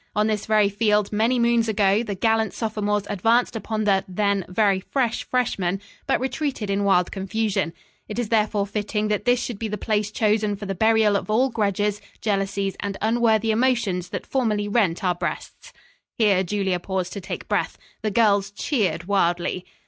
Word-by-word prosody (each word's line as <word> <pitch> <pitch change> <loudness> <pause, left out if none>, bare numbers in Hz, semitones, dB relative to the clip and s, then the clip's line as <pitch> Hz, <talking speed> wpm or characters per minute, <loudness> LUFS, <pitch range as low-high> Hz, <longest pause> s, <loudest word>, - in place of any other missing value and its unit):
On 210 +1 +2
this 215 -1 -1
very 215 -2 +4
field 210 0 +1
many 225 +4 +2
moons 235 -1 +2
ago 205 0 +3
the 210 -4 -4
gallant 220 +1 +1
sophomores 210 -2 -1
advanced 230 +5 +1
upon 220 0 -2
the, 195 -2 +2
then, 200 0 0
very 195 0 +2
fresh 245 +3 -1
freshmen, 195 -8 0 0.3
but - - +2
retreated 260 -5 -2
in 200 +1 0
wild 180 -3 +3
confusion. 195 -3 -1 0.4
It 210 - -6
is 240 -3 -2
therefore 215 -2 +1
fitting 210 +1 -2
that 210 -1 -1
this 245 0 +3
should 230 -5 -5
be 225 - -2
the 210 0 -4
place 210 0 -1
chosen 210 -1 +1
for 205 - -8
the 195 - -2
burial 220 +1 +3
of 200 - -2
all 250 +5 +2
grudges, 205 -1 0 0.2
jealousies 195 -2 -1
and 200 -1 -4
unworthy 225 -1 +2
emotions 220 -7 +1
that - - -5
formerly 215 -6 0
rent 205 -4 +1
our 180 -1 +2
breasts." 485 - -6 0.5
Here 205 -5 +4
Julia 190 -1 -1
paused 185 0 -3
to 200 - -6
take 185 - -6
breath. - - -1 0.2
The 215 - 0
girls 205 -2 +3
cheered 200 - -1
wildly. 175 -1 0
210 Hz, 175 wpm, -23 LUFS, 195-225 Hz, 0.5 s, very